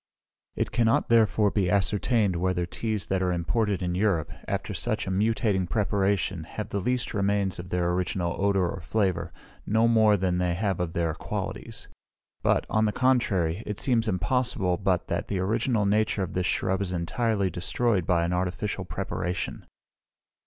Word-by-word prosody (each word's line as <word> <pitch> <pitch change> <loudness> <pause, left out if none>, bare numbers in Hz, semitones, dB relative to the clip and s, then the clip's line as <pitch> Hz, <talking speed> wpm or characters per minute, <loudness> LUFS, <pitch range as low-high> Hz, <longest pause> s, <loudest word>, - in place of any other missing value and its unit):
It - - -1
cannot, 115 -2 +2
therefore, 110 -2 +4
be 95 -4 +1
ascertained 100 +1 +1
whether 90 0 0
teas 110 +3 -3
that 95 -1 0
are 90 -1 +1
imported 95 +3 0
in 90 0 -1
Europe, 90 -6 +1 0.2
after - - -2
such - - -2
a - - -3
mutating 100 -2 +1
preparation, 100 -4 0
have 105 +5 -6
the 100 - -2
least 125 +5 -1
remains 100 -2 0
of 90 +1 -7
their 90 -1 0
original 90 -1 -1
odour 100 -3 +2
or - - -5
flavour, 90 -2 -1 0.3
no 110 +2 +2
more 110 -3 +5
than 90 -2 0
they 90 -1 +1
have 100 -1 -1
of 85 -2 -2
their 85 -2 0
qualities; - - -5 0.5
but, - - +2
on 110 0 +2
the 105 - +1
contrary, 105 -8 +1
it 105 -1 -3
seems 120 -3 +1
impossible 95 -1 +1
but 95 -2 0
that - - -2
the 100 - -2
original 110 +3 +1
nature 105 0 +1
of 90 - -5
this 90 0 0
shrub 95 0 0
is 90 -2 -2
entirely 100 +3 0
destroyed 95 +2 0
by 85 -2 +3
an 85 +1 -1
artificial 90 +3 -2
preparation. 90 +1 -4
95 Hz, 165 wpm, -27 LUFS, 90-110 Hz, 0.5 s, more